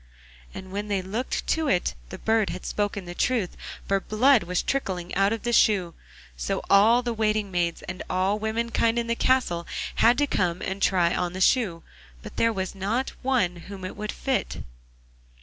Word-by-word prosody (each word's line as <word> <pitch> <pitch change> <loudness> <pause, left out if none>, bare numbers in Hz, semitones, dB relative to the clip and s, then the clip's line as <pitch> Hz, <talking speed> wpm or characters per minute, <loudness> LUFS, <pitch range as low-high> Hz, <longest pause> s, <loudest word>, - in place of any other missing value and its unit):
And 190 0 -9
when 205 +2 -3
they 200 -2 -1
looked 220 +7 -3
to 320 -1 0
it 180 - +1 0.2
the - - -7
bird 220 -2 +1
had - - -6
spoken 205 -2 -2
the 175 - -7
truth, 220 -1 0 0.3
for 195 0 +2
blood 240 +5 +4
was 180 +1 -1
trickling 185 -10 -2
out 195 +2 +3
of 225 - -3
the 240 0 -1
shoe. 190 -7 +3 0.4
So - - -2
all 225 +5 +6
the 240 -1 -1
waiting 215 -2 0
maids, 175 -2 -1
and 185 - -6
all 190 +3 +1
the 220 +1 -1
womenkind 230 0 0
in 235 - 0
the 235 - 0
castle 230 -11 +1 0.3
had 240 +2 +5
to 290 - +3
come 180 -9 0
and 195 +1 -4
try 175 -3 +3
on 180 -1 -1
the 185 - -5
shoe, 190 -5 +2 0.4
but - - -10
there 230 - +3
was 190 -3 -3
not 210 +7 -1
one 235 -10 +1
whom 190 +2 -9
it 185 - -6
would 210 0 -4
fit. 270 -1 -2
205 Hz, 190 wpm, -25 LUFS, 185-230 Hz, 0.4 s, all